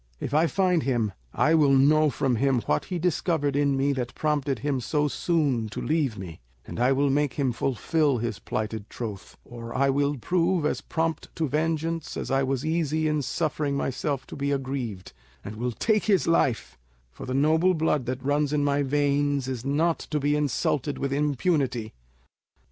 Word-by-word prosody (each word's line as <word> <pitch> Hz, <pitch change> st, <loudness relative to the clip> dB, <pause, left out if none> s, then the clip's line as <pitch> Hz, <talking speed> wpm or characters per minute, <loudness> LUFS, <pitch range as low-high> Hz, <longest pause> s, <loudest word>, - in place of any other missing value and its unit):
If 130 Hz, -, -4 dB
I 160 Hz, +3 st, +4 dB
find 180 Hz, -2 st, +2 dB
him, 120 Hz, -6 st, 0 dB, 0.2 s
I 155 Hz, -, +2 dB
will 150 Hz, -4 st, +5 dB
know 150 Hz, +3 st, +5 dB
from 130 Hz, -3 st, 0 dB
him 135 Hz, 0 st, +2 dB
what 75 Hz, -7 st, 0 dB
he 180 Hz, -, -3 dB
discovered 160 Hz, -4 st, 0 dB
in 140 Hz, -1 st, +2 dB
me 140 Hz, +1 st, +2 dB
that 125 Hz, -2 st, -4 dB
prompted 145 Hz, -3 st, 0 dB
him 135 Hz, +2 st, -1 dB
so 150 Hz, +5 st, 0 dB
soon 145 Hz, -8 st, 0 dB
to 110 Hz, -, -6 dB
leave 145 Hz, -8 st, 0 dB
me; 85 Hz, -6 st, -8 dB, 0.2 s
and -, -, -7 dB
I 125 Hz, +2 st, +3 dB
will 140 Hz, +1 st, +2 dB
make 145 Hz, -1 st, +1 dB
him 140 Hz, -4 st, +1 dB
fulfil 135 Hz, +4 st, 0 dB
his 115 Hz, -2 st, -3 dB
plighted 110 Hz, -1 st, -4 dB
troth, 105 Hz, -5 st, -7 dB
or 115 Hz, -1 st, -8 dB
I 135 Hz, +1 st, +3 dB
will 145 Hz, +1 st, 0 dB
prove 170 Hz, +4 st, +1 dB
as 150 Hz, -, 0 dB
prompt 165 Hz, 0 st, -2 dB
to 160 Hz, -, 0 dB
vengeance 160 Hz, +2 st, -2 dB
as -, -, -4 dB
I 135 Hz, 0 st, +3 dB
was 135 Hz, 0 st, -1 dB
easy 160 Hz, -1 st, 0 dB
in 150 Hz, -1 st, +1 dB
suffering 145 Hz, 0 st, -1 dB
myself 135 Hz, 0 st, -2 dB
to -, -, -9 dB
be 140 Hz, 0 st, -2 dB
aggrieved, 130 Hz, -8 st, -4 dB, 0.3 s
and 100 Hz, -, -6 dB
will 120 Hz, +3 st, -2 dB
take 215 Hz, -, +1 dB
his 200 Hz, -4 st, +3 dB
life; 130 Hz, -, +1 dB, 0.3 s
for -, -, -9 dB
the 130 Hz, -, -2 dB
noble 160 Hz, +6 st, +3 dB
blood 150 Hz, -5 st, 0 dB
that 130 Hz, +1 st, -3 dB
runs 145 Hz, 0 st, +1 dB
in 150 Hz, -1 st, +1 dB
my 145 Hz, 0 st, +2 dB
veins 145 Hz, -1 st, +1 dB
is 130 Hz, -3 st, -4 dB
not 155 Hz, +5 st, +1 dB
to 150 Hz, -, 0 dB
be 145 Hz, +1 st, +1 dB
insulted 145 Hz, 0 st, 0 dB
with 135 Hz, 0 st, -2 dB
impunity. 140 Hz, -5 st, 0 dB
140 Hz, 185 wpm, -26 LUFS, 130-155 Hz, 0.3 s, will